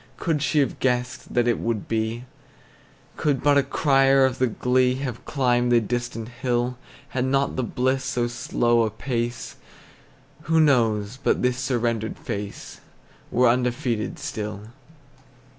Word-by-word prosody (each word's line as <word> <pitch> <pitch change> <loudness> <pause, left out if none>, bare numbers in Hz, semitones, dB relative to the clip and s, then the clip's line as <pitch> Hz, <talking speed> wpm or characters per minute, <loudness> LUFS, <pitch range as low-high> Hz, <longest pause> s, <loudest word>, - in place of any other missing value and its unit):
Could 160 -4 -1
she 150 - 0
have 135 - -2
guessed 125 0 -1
that 120 -1 +3
it 120 - +1
would 115 -3 -2
be; 115 +1 -2 0.9
Could 145 -4 0
but 145 -1 +5
a - - +4
crier 135 -1 +3
of 130 -2 -1
the 130 - +3
glee 125 +2 +1
Have 130 -3 -5
climbed 125 -3 +1
the 120 - +6
distant 115 0 -3
hill; 125 0 -1 0.3
Had 130 -3 -1
not 135 +1 +1
the - - 0
bliss 130 +2 0
so 125 -3 -1
slow 120 -1 +1
a 110 - +1
pace, 120 +1 -4 0.9
Who 160 0 +4
knows 115 -6 +2
but - - +1
this 125 0 +1
surrendered 115 -4 -1
face 105 -3 -6 0.5
Were 125 +1 +3
undefeated 120 -2 0
still? 105 0 -5
125 Hz, 140 wpm, -24 LUFS, 115-130 Hz, 0.9 s, the